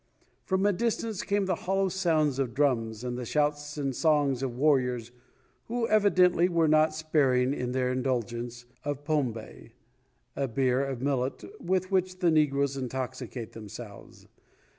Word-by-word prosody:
From 190 +1 +1
a 205 - +4
distance 225 0 -1
came 200 -1 0
the 185 - +1
hollow 195 +3 0
sounds 160 -7 +1
of 125 -4 -2
drums 120 -6 0
and 125 0 -3
the - - -4
shouts 150 +3 -1
and 135 -3 -2
songs 145 -5 +2
of 125 -3 -3
warriors 125 -5 +1 0.5
who 235 0 -1
evidently 185 -4 +4
were 165 -2 +2
not 155 0 +4
sparing 140 -5 +2
in 125 -3 -3
their 125 0 0
indulgence 120 -2 -2 0.2
of 145 -1 -3
pombe,* 130 -8 -2 0.3
[* - - -43
A 140 - -1
beer 130 +2 +1
of 135 -2 -4
millet 135 -2 -1 0.2
with 185 +1 0
which 185 -1 +1
the 175 -3 +2
negroes 140 -3 +2
intoxicate 130 -2 -5
themselves. 105 -1 -11
140 Hz, 150 wpm, -28 LUFS, 125-170 Hz, 0.5 s, a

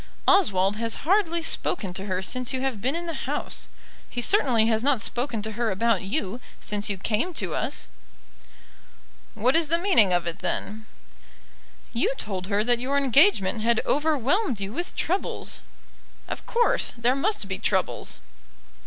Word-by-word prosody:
Oswald 205 - +4
has 230 0 -1
hardly 340 -2 +2
spoken 200 - -1
to 190 +2 -6
her 185 -1 -2
since 250 +5 0
you 260 - -2
have 260 -6 -2
been 265 +7 0
in 340 +1 -3
the 335 - -4
house. - - -3 0.4
He 245 - -5
certainly 245 - +3
has 220 -1 +1
not 275 -1 +2
spoken 240 -1 -1
to 220 - -3
her 235 +1 -1
about 215 +1 +1
you 205 +1 -3 0.2
since 205 0 -2
you 200 - -2
came 230 - -1
to - - -1
us." - - -2 1.5
"What 245 +6 +2
is 330 -1 +3
the 335 +3 +2
meaning 340 - +5
of 175 -1 +1
it, 170 +2 -4
then?" 220 +1 -2 1.1
"You 245 +3 0
told 190 -6 -4
her 205 +1 +1
that 240 +1 +2
your 270 +3 0
engagement 270 - +4
had 235 +1 +2
overwhelmed 295 - +1
you 195 +1 -4
with 345 +6 -5
troubles." 370 +4 -2 0.7
"Of - - -7
course; 475 0 +2
there 240 +2 +2
must 330 - 0
be 190 - -3
troubles." - - -1
240 Hz, 160 wpm, -25 LUFS, 205-305 Hz, 1.5 s, meaning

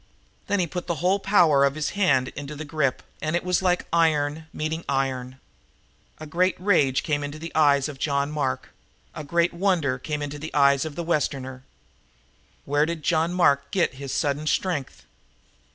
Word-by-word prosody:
Then 205 - +1
he 180 - +2
put 175 +2 -6
the 170 - -1
whole 180 +6 +1
power 175 -8 +4
of 140 0 +2
his 155 -1 -2
own - - -12
hand 135 -10 +3
into 145 +1 -7
the 155 +2 -6
grip, 145 -3 -1 0.2
and 155 +2 -1
it 175 - 0
was 180 0 +1
like 180 -1 +1
iron 160 -1 +1
meeting 160 +2 -3
iron. 130 -1 -2 0.8
A 155 - -7
great 180 +4 +1
rage 150 -9 +2
came 145 -2 -1
in 145 - -3
the 155 +3 -8
eyes 145 -3 +4
of 145 -3 -9
John 140 0 0
Mark; 145 -4 -2 0.4
a 155 - -6
great 170 +4 +1
wonder 170 -8 +1
came 150 +2 -3
in 145 - -4
the 150 +2 -7
eyes 140 0 +4
of 155 -2 -6
the 170 - -3
Westerner. 135 -5 -2 1.0
Where 145 +2 +2
did 165 -2 -4
John 165 +1 +1
Mark 140 -6 +2
get 175 -3 +1
his 135 0 -7
sudden 145 0 -1
strength? 160 -6 -2
150 Hz, 185 wpm, -24 LUFS, 140-170 Hz, 1.0 s, power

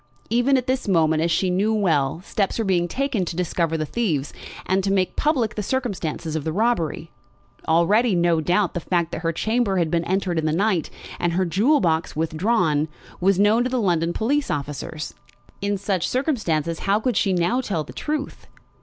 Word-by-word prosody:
Even 245 +4 +3
at 250 - -1
this 260 -2 -1
moment, 160 -4 +3
as 170 - +1
she 180 +3 +1
knew 200 +4 +1
well, 160 -7 +1
steps 200 0 -1
were 225 - -1
being 175 -3 +1
taken 255 +1 -1
to 170 - -4
discover 170 -2 0
the 155 - -2
thieves, 155 - -1 0.3
and 190 +1 +1
to 195 - 0
make 190 -2 +1
public 260 -8 +1
the 210 - -3
circumstances 190 - -3
of 155 - -2
the 160 - -2
robbery. 170 -6 -1 0.6
Already, 190 +7 +3
no 170 -2 +2
doubt, 180 +4 +1
the - - -2
fact 170 0 -1
that 155 - -4
her 165 0 0
chamber 220 +3 0
had 165 -3 +1
been 170 -1 +1
entered 185 -2 0
in 155 - -1
the - - +1
night, 190 -2 +1 0.3
and 175 -1 0
her 185 +2 +1
jewel 215 - +3
box 165 -3 0
withdrawn, 160 -1 +1 0.3
was 190 +1 +3
known 210 +4 +4
to 250 - -1
the 255 0 0
London 170 -5 +1
police 275 +9 0
officers. 150 +2 -4 0.5
In 200 0 0
such 195 -3 -1
circumstances 170 - -1
how 200 +2 +1
could 245 0 -1
she 195 - +2
now 185 +8 +1
tell 195 -10 -2
the - - -12
truth? 300 -1 -4
185 Hz, 195 wpm, -23 LUFS, 165-220 Hz, 0.6 s, known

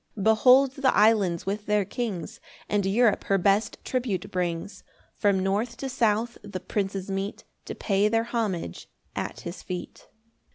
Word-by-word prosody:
2 200 - -4
[Behold 250 +5 +6
the 270 -2 +2
islands 205 -6 +3
with 205 +2 -3
their 210 -1 +2
kings, 210 -7 -4 0.3
And 205 -1 +1
Europe 220 +2 +3
her 195 - +2
best 200 +3 +2
tribute 240 -7 -2
brings; 180 +2 -3 0.3
From 200 -2 +2
north 215 +5 -1
to 270 - -4
south 235 -2 0
the 200 -2 -6
princes 195 0 -3
meet 195 +1 -3 0.2
To - - -6
pay 200 0 +1
their 225 +1 +2
homage 210 - -3 0.3
at - - -4
his 170 +1 -7
feet. 180 -1 -7
205 Hz, 155 wpm, -26 LUFS, 195-230 Hz, 0.3 s, Behold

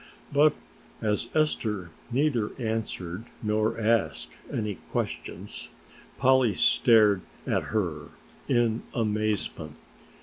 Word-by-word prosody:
But 150 +1 +5 0.4
as 105 +1 0
Esther 105 - 0 0.2
neither 125 -4 +1
answered 110 -4 -3 0.2
nor 110 +1 +1
asked 110 -10 +1 0.2
any 105 -2 -1 0.2
questions - - -4 0.5
Polly 130 -5 +4
stared 105 -5 +5 0.2
at - - 0
her 90 -9 -2 0.4
in 120 -1 +2
amazement. 110 -2 -1
110 Hz, 90 wpm, -27 LUFS, 105-120 Hz, 0.5 s, But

